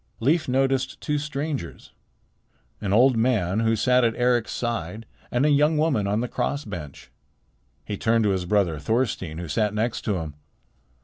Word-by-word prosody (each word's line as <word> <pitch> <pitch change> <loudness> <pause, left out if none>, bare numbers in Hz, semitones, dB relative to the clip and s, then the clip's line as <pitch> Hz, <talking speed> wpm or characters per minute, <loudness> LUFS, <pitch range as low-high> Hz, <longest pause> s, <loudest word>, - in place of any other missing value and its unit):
Leif 150 +8 +2
noticed 130 0 0
two 150 -2 -1
strangers, 145 - -5 0.9
an 100 -3 -2
old 125 +5 +5
man 110 -5 +1
who 115 0 +2
sat 125 +3 +3
at 115 -1 +2
Eric's 120 -2 +1
side 115 -2 -3 0.2
and 125 +4 +1
a - - +4
young 150 +2 +3
woman 150 -10 +1
on 105 +3 0
the 125 - -2
cross 140 +4 -2
bench. 85 -9 -8 0.7
He 105 - -4
turned 115 +1 +2
to 105 - +2
his 95 -2 -1
brother 90 -5 +1
Thorstein 95 - -1
who 85 0 -5
sat 105 +7 0
next 110 +2 -1
to 105 - 0
him. 80 -4 -4
115 Hz, 170 wpm, -24 LUFS, 100-130 Hz, 0.9 s, old